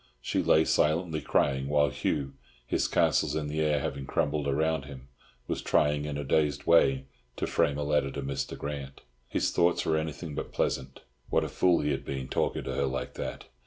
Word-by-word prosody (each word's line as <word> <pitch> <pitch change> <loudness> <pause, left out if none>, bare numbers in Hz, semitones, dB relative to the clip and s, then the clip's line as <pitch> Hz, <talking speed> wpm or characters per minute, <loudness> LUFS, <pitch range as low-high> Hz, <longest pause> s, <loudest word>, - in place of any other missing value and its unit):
She - - -1
lay 80 +1 +4
silently 80 +1 +1
crying, 65 -1 +1
while 75 0 +3
Hugh, 70 0 -2 0.3
his - - 0
castles 70 - +2
in 80 -1 -1
the 80 +1 -1
air 75 -1 +2
having 70 0 -4
crumbled 75 0 0
around 80 +1 +1
him, 65 -2 -11 0.4
was - - -2
trying 75 0 +2
in 75 -1 -3
a 75 - -3
dazed 75 +1 +1
way 65 -5 +4 0.3
to - - -2
frame 70 - +1
a 75 - -1
letter 75 -1 +1
to 70 - -4
Mr. 70 +1 -3
Grant. 70 -2 -6 0.3
His - - 0
thoughts 85 0 +2
were 80 - +2
anything 80 0 -4
but - - -5
pleasant. 65 -1 -2 0.3
What - - +2
a - - -3
fool 90 -2 +3
he 75 - 0
had 70 - -2
been, 65 -1 -5
talking - - 0
to 65 - -4
her 70 +2 0
like 65 -1 -3
that! - - -5
75 Hz, 200 wpm, -29 LUFS, 70-75 Hz, 0.4 s, lay